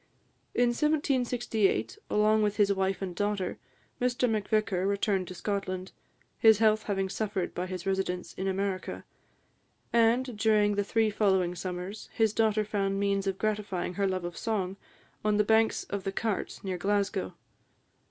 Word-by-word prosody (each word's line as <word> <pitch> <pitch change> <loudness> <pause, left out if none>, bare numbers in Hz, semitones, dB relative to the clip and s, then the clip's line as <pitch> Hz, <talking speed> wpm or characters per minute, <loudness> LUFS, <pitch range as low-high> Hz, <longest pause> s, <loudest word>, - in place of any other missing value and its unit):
In 245 0 +4
1768, 245 - +1
along 215 +1 +3
with 210 -1 0
his 200 -2 +4
wife 190 0 -1
and 180 -2 -4
daughter, 205 -1 -1 0.4
Mr 250 +1 +2
Macvicar 215 -3 0
returned 200 -2 0
to 185 - -8
Scotland, 185 -1 -3 0.5
his 220 -2 +7
health 215 0 +4
having 195 -2 0
suffered 195 -2 -2
by 180 +1 -3
his 185 -1 -5
residence 190 -2 -2
in 190 - -3
America; 190 0 -2 0.9
and, 235 +2 +3
during 210 -1 +3
the 205 0 +1
three 220 +1 +1
following 190 -4 +2
summers, 180 +3 -6
his 220 -2 +2
daughter 215 -1 +2
found 195 -1 -1
means 200 -1 0
of 195 -1 -1
gratifying 205 -5 -2
her 200 +1 0
love 185 -1 -2
of 175 -1 -5
song, 195 -4 -2 0.5
on 210 -1 +2
the 210 - +4
banks 220 +1 +3
of 200 -1 -5
the 195 - -2
Cart, 215 0 -2
near 185 -2 -3
Glasgow. 200 - 0
200 Hz, 150 wpm, -29 LUFS, 190-220 Hz, 0.9 s, his